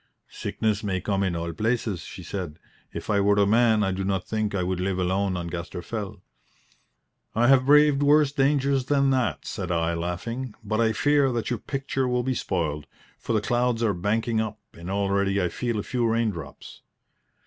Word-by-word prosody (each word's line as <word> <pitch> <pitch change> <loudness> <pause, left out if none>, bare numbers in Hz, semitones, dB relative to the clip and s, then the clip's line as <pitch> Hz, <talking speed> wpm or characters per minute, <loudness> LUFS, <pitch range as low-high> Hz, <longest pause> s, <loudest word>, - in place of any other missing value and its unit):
"Sickness 110 -1 -2
may 95 -3 -1
come 100 +1 -1
in 95 -3 0
all 85 0 -3
places," 110 -4 -1
said 90 -4 -6 0.3
she. - - -6
"If - - -4
I 100 - +3
were 100 +1 +4
a 100 0 +4
man 110 0 +4
I 95 - +1
do 95 +1 -2
not 95 -1 -1
think 110 -2 -1
I 90 - 0
would 90 0 -2
live 95 0 -1
alone 95 +1 0
on 85 - -4
Gaster 85 0 -5
Fell." 105 -4 -6 1.1
"I 115 +2 +3
have 130 -1 +5
braved 150 -1 +6
worse 145 0 +4
dangers 140 -1 +2
than 140 -1 +2
that," 120 - 0
said 90 -3 -4
I, 85 0 +1
laughing; 105 +9 -4
"but 110 +2 0
I 110 -1 +3
fear 145 +3 +3
that 120 +1 -2
your 120 - -1
picture 135 0 -2
will 125 0 0
be 130 +1 0
spoiled, 80 - -2 0.3
for - - -3
the 110 - +2
clouds 120 0 0
are 110 -3 +2
banking 110 +5 0
up, 110 -1 -4 0.2
and 85 +2 -9
already 100 0 +1
I 90 -2 +1
feel 120 +2 -2
a 105 - -2
few 120 -2 0
raindrops." 110 -10 -3
105 Hz, 190 wpm, -25 LUFS, 95-125 Hz, 1.1 s, braved